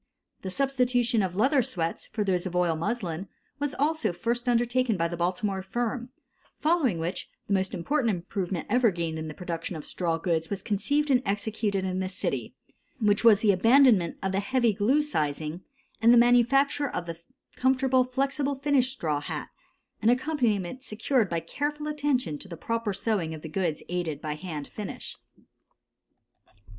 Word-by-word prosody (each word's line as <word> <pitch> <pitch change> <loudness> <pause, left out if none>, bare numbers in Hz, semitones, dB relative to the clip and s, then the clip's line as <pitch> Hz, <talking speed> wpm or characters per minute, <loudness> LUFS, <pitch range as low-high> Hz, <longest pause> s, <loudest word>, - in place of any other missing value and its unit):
The 190 - -4
substitution 245 -1 +1
of 185 -2 -2
leather 260 +7 +3
sweats 180 -10 -3
for 215 - -2
those 185 -2 0
of 180 - -6
oil 175 -2 +2
muslin 180 0 -3 0.3
was 290 0 -2
also 310 - +1
first 235 +7 -2
undertaken 240 -1 +2
by 165 0 +1
the 170 - -5
Baltimore 185 +3 -1
firm; 240 +5 -3 0.5
following 300 - +2
which, 165 +3 -4 0.2
the 200 - -1
most 190 -1 +1
important 235 - 0
improvement 180 0 -3
ever 245 +1 +4
gained 165 -3 -3
in 160 - -5
the 155 - -7
production 170 -1 -4
of 155 - -7
straw 170 -2 -1
goods 165 -1 -1
was 200 -1 -4
conceived 285 +8 +1
and 255 -1 +4
executed 205 -1 -1
in 185 0 -2
this 185 0 -4
city, - - -3 0.4
which 205 -2 +2
was 215 -3 +7
the 215 - +5
abandonment 225 -2 +5
of 190 - 0
the 190 - +1
heavy 240 +1 +2
glue 250 +10 +2
sizing 155 - -2 0.4
and 230 +1 +6
the 240 - +7
manufacture 250 +4 +4
of 175 - -4
the 165 -1 -6 0.4
comfortable 260 0 +3
"flexible 275 +2 -1
finish" 270 -2 +2
straw 155 - -1
hat, - - -5 0.5
an 220 - +4
accomplishment 245 - 0
secured 225 -2 0
by 170 - 0
careful 295 - -3
attention 275 - 0
to - - -7
the 170 -3 -8
proper 230 +1 -2
sewing 190 -6 -1
of 155 - -11
the - - -5
goods 165 -1 -2
aided 170 -5 -2
by 155 0 -3
hand 150 -2 -6
finish. 210 -3 -7
210 Hz, 170 wpm, -27 LUFS, 175-255 Hz, 0.5 s, was